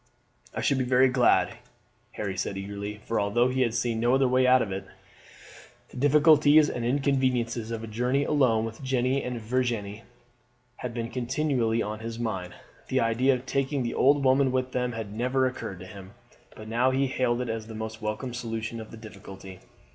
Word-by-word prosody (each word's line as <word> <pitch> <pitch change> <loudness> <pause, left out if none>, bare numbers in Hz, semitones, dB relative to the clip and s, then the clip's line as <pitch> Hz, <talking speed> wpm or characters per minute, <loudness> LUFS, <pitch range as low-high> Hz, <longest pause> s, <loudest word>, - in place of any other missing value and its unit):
"I - - -2
should 140 - +1
be - - +1
very 130 +1 +4
glad," 125 -1 +3 0.6
Harry 100 -3 -4
said 95 +1 -3
eagerly, 100 +1 -6
for 115 - 0
although 115 +5 +2
he 130 +1 0
had 120 -2 +1
seen 115 -1 -1
no 120 +3 +3
other 135 -1 +3
way 130 0 +3
out 125 -1 +5
of 100 - -6
it, 95 0 -5 1.0
the - - -12
difficulties 150 +2 +5
and 120 - -4
inconveniences 125 -3 0
of 115 -1 -4
a - - -6
journey 125 +5 0
alone 125 -7 +2
with 110 +2 -8
Jeanne 130 -2 0 0.2
and 125 -1 -4
Virginie 115 -3 -2 0.8
had 120 -2 -6
been 115 0 -4
continually 125 -3 0
on 105 +1 -5
his 115 0 -6
mind. 95 -6 -4 0.3
The - - +1
idea 125 +4 +2
of 125 +1 -7
taking 135 +1 -1
the 120 - -2
old 140 +1 +3
woman 130 0 +4
with 130 0 -1
them 125 -1 -1
had 110 -3 -6
never 130 +4 +1
occurred 125 -7 -4
to - - -8
him, 100 +1 -12 0.4
but 110 - -10
now 120 +4 +2
he 135 +1 +1
hailed 125 -2 0
it 125 -2 -3
as 115 0 -4
a 110 - -7
most 110 0 -6
welcome 110 +4 -4
solution 115 -1 -4
of 110 - -10
the 115 - -11
difficulty. 100 -3 -11
120 Hz, 195 wpm, -27 LUFS, 110-130 Hz, 1.0 s, out